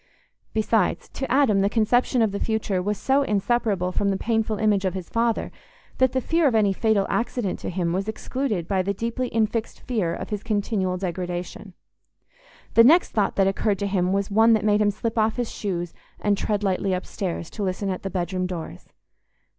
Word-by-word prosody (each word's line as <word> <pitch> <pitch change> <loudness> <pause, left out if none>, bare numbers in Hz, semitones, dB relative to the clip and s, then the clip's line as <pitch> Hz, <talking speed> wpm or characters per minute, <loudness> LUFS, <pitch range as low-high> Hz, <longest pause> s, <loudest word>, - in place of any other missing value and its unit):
Besides, 220 -3 0
to 270 - -5
Adam, 250 -7 +4
the 200 - +2
conception 240 +2 +2
of 215 - +1
the 200 - -3
future 215 -4 -1
was 205 +2 -1
so 270 +6 +2
inseparable 210 -5 0
from 200 +2 0
the 195 - 0
painful 220 0 0
image 205 -2 +2
of 190 0 -1
his 185 -2 -6
father 230 -1 0 0.5
that 260 -1 +4
the 260 - +2
fear 325 +4 +2
of 245 - +1
any 205 -3 +3
fatal 215 -1 +2
accident 230 -4 -2
to - - -4
him 175 -2 -1
was 195 +3 -2
excluded 220 -4 -3
by 190 -2 +1
the 200 +2 -2
deeply 235 +4 -2
infixed 225 0 -1
fear 215 -9 -1
of - - -7
his 210 -1 -2
continual 205 -4 -1
degradation. 180 +1 -5 1.0
The 230 - +7
next 325 +9 +5
thought 205 -3 0
that 195 - +3
occurred 195 +1 +1
to 200 - -2
him 185 -2 0
was 200 +1 -1
one 225 +2 +5
that 215 -1 +1
made 210 0 +3
him 210 - +4
slip 220 +2 -2
off 220 0 +2
his 245 -2 -2
shoes 175 -4 -3 0.3
and 205 -1 +2
tread 205 +1 -1
lightly 190 0 0
upstairs, 180 -2 -4
to 215 - -7
listen 195 +1 -2
at 185 - -4
the 195 - -4
bedroom 185 0 -2
doors. 165 - -7
205 Hz, 195 wpm, -24 LUFS, 190-225 Hz, 1.0 s, The